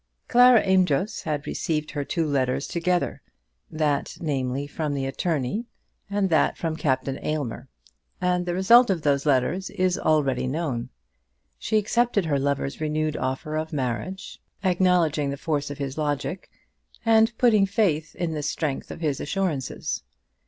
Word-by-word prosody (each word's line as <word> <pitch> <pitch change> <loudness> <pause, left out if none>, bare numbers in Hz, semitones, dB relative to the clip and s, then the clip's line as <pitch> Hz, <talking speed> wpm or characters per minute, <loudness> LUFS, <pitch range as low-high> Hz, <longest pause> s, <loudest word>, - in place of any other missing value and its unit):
Clara 245 -1 +6
Amedroz 185 0 +2
had 145 -2 -2
received 155 -2 -2
her 145 - -2
two 165 +3 -1
letters 135 -2 0
together, 175 +1 -1 0.5
that, 150 -3 -1
namely, 135 -3 -2
from 145 0 -3
the 135 -1 -2
attorney, 155 - -2 0.4
and 200 -2 0
that 155 -3 +3
from 165 -2 -2
Captain 135 -2 -1
Aylmer, 135 -5 -3 0.5
and 180 0 0
the 175 - -1
result 235 +6 +6
of 175 -5 0
those 140 0 +1
letters 145 +8 +1
is 185 -1 0
already 135 -5 +1
known. 130 -4 -2 0.7
She 220 - 0
accepted 220 -1 +1
her 145 -3 +1
lover's 140 +1 -2
renewed 155 0 -1
offer 130 +4 -3
of 155 0 -2
marriage, 145 +7 -4 0.2
acknowledging 175 -6 +2
the 140 - -3
force 145 -1 -2
of 145 - -6
his 140 +1 -4
logic, 150 +5 -2 0.6
and 225 0 +5
putting 215 -5 +4
faith 175 -7 0
in 170 -2 -2
the 150 - -3
strength 145 -1 -2
of - - -8
his 150 -4 0
assurances. 160 -6 -2
155 Hz, 145 wpm, -25 LUFS, 140-185 Hz, 0.7 s, Clara